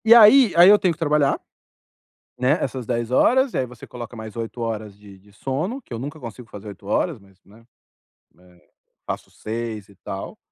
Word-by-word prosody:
E 230 +1 +9
aí 235 +1 +8
aí 175 +2 +8
eu 205 0 +7
tenho 180 -3 +2
que - - -15
trabalhar, 150 -3 +2 1.0
né, 130 +5 +2
essas 130 -2 -3
10 120 0 -2
horas. 260 - +3
Aí 130 - +1
você 125 -2 -12
coloca 120 -1 -8
mais 110 -1 -8
8 115 +1 -5
horas 110 -3 -4
de 100 -2 -15
de 100 +2 -22
sono. 150 - -3
Que 175 - -11
eu 115 - -4
nunca 145 +5 -6
consigo 120 -2 -9
fazer 105 +1 -10
8 100 0 -12
horas, 145 - 0
mas, 95 -1 -22
né, 110 +3 -19 0.7
eh, 90 -1 -23 0.4
faço - - -5
6 110 -2 -5
e 100 - -19
tal. 95 +2 -7
120 Hz, 195 wpm, -22 LUFS, 105-150 Hz, 1.0 s, E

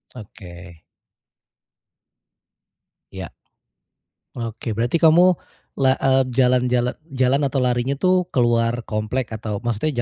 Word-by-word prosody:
Oke. 90 -6 -12 2.3
Ya. 95 -3 -7 1.0
Oke 115 -1 -5
berarti 120 +9 0
kamu 165 +2 +6 0.5
la 130 -1 +3
eee, 135 0 +3
jalan-jalan 125 -1 +2 0.2
jalan 130 +2 +2
atau 135 0 -2
larinya 125 +2 0
itu 185 +4 +2
keluar 120 -1 +1
komplek 110 +3 -3
atau 110 -2 -5
maksudnya 120 +6 -1
120 Hz, 95 wpm, -21 LUFS, 110-130 Hz, 2.3 s, kamu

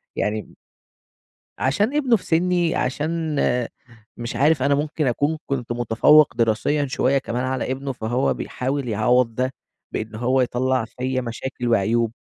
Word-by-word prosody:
يعني 105 0 -3 1.0
عشان 205 - +1
ابنه 260 -6 +3
في - - -15
سني، 175 0 +1
عشان 155 +4 -1 0.8
مش 120 0 -5
عارف 145 -1 +3
أنا 140 +1 +3
ممكن 150 0 -1
أكون 145 +6 0
كنت 125 -4 -3
متفوّق 120 +6 +4
دراسيًا 115 +6 +1
شوية 130 +1 +1
كمان 125 -1 -2
على 130 0 -2
ابنه، 135 +1 -3
فهو 125 +1 0
بيحاول 135 0 -3
يعوّض 115 +2 +2
ده، 130 +2 -1 0.4
بإن 110 0 -4
هو 130 +3 +1
يَطلَّع 125 0 0
فيّا 130 +2 -3
مشاكل 120 +1 -5
وعيوب. 115 +1 +2
130 Hz, 135 wpm, -22 LUFS, 120-145 Hz, 1.0 s, متفوّق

